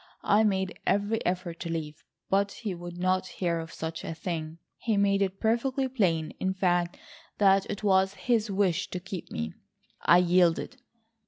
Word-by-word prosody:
I 205 Hz, +2 st, +4 dB
made 190 Hz, -3 st, 0 dB
every 205 Hz, +3 st, +1 dB
effort 180 Hz, -2 st, -2 dB
to 170 Hz, -, -5 dB
leave, 155 Hz, -2 st, -5 dB, 0.2 s
but 200 Hz, +1 st, +1 dB
he 210 Hz, -5 st, -4 dB
would 175 Hz, 0 st, -8 dB
not 185 Hz, +1 st, +1 dB
hear 170 Hz, -3 st, 0 dB
of 165 Hz, 0 st, -7 dB
such 160 Hz, 0 st, -5 dB
a 165 Hz, -, -5 dB
thing. 160 Hz, -1 st, -4 dB, 0.2 s
He 220 Hz, -3 st, 0 dB
made 200 Hz, 0 st, +3 dB
it 195 Hz, 0 st, -1 dB
perfectly 255 Hz, +4 st, +1 dB
plain 180 Hz, -11 st, 0 dB
in 190 Hz, 0 st, -1 dB
fact 175 Hz, -2 st, +1 dB, 0.4 s
that 195 Hz, -1 st, +4 dB
it 205 Hz, -, -4 dB
was 190 Hz, -1 st, +3 dB
his 230 Hz, -2 st, +1 dB
wish 190 Hz, -2 st, +1 dB
to 180 Hz, -, -4 dB
keep 185 Hz, -1 st, -7 dB
me. 80 Hz, 0 st, -4 dB, 0.5 s
I 175 Hz, -, +6 dB
yielded. 180 Hz, +7 st, +2 dB
190 Hz, 170 wpm, -28 LUFS, 170-200 Hz, 0.5 s, I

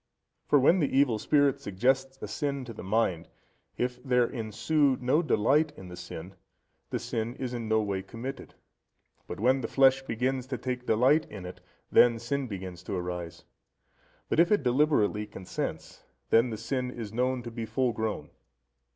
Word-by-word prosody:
For 145 Hz, -, +5 dB
when 165 Hz, +8 st, +5 dB
the 145 Hz, -, +1 dB
evil 130 Hz, -5 st, +3 dB
spirit 145 Hz, +2 st, +3 dB
suggests 130 Hz, +5 st, 0 dB
a -, -, -3 dB
sin 140 Hz, -2 st, -3 dB
to 115 Hz, -, -8 dB
the -, -, -9 dB
mind, 95 Hz, -4 st, 0 dB, 0.5 s
if 125 Hz, 0 st, -2 dB
there 125 Hz, -2 st, +3 dB
ensue 125 Hz, +5 st, +1 dB
no 130 Hz, +6 st, +2 dB
delight 150 Hz, +2 st, +2 dB
in 95 Hz, -1 st, -10 dB
the 90 Hz, -, -8 dB
sin, 90 Hz, +1 st, -8 dB, 0.6 s
the -, -, -1 dB
sin 115 Hz, +2 st, -3 dB
is 125 Hz, -2 st, -4 dB
in 115 Hz, -2 st, -4 dB
no 110 Hz, 0 st, +3 dB
way 100 Hz, -2 st, -2 dB
committed; 115 Hz, +7 st, -8 dB, 0.7 s
but -, -, -6 dB
when 130 Hz, +4 st, +3 dB
the -, -, -2 dB
flesh 135 Hz, 0 st, +4 dB
begins 130 Hz, +1 st, -2 dB
to 130 Hz, -1 st, -3 dB
take 125 Hz, 0 st, -4 dB
delight 130 Hz, +8 st, +4 dB
in 100 Hz, -3 st, -8 dB
it, 90 Hz, -, -9 dB, 0.3 s
then 120 Hz, -1 st, +6 dB
sin 130 Hz, +4 st, -2 dB
begins 95 Hz, -4 st, -7 dB
to 100 Hz, -, -3 dB
arise. 90 Hz, -1 st, -5 dB, 0.8 s
But -, -, 0 dB
if 170 Hz, +3 st, +5 dB
it 205 Hz, -8 st, +3 dB
deliberately 125 Hz, -6 st, +2 dB
consents, 95 Hz, -3 st, -6 dB, 0.3 s
then 115 Hz, +2 st, +5 dB
the 110 Hz, -, -4 dB
sin 125 Hz, +2 st, -2 dB
is 115 Hz, -4 st, -7 dB
known 125 Hz, +1 st, 0 dB
to 120 Hz, -, -7 dB
be 115 Hz, -1 st, -5 dB
full 120 Hz, +2 st, 0 dB
grown. 110 Hz, -2 st, -3 dB
125 Hz, 175 wpm, -29 LUFS, 105-135 Hz, 0.8 s, then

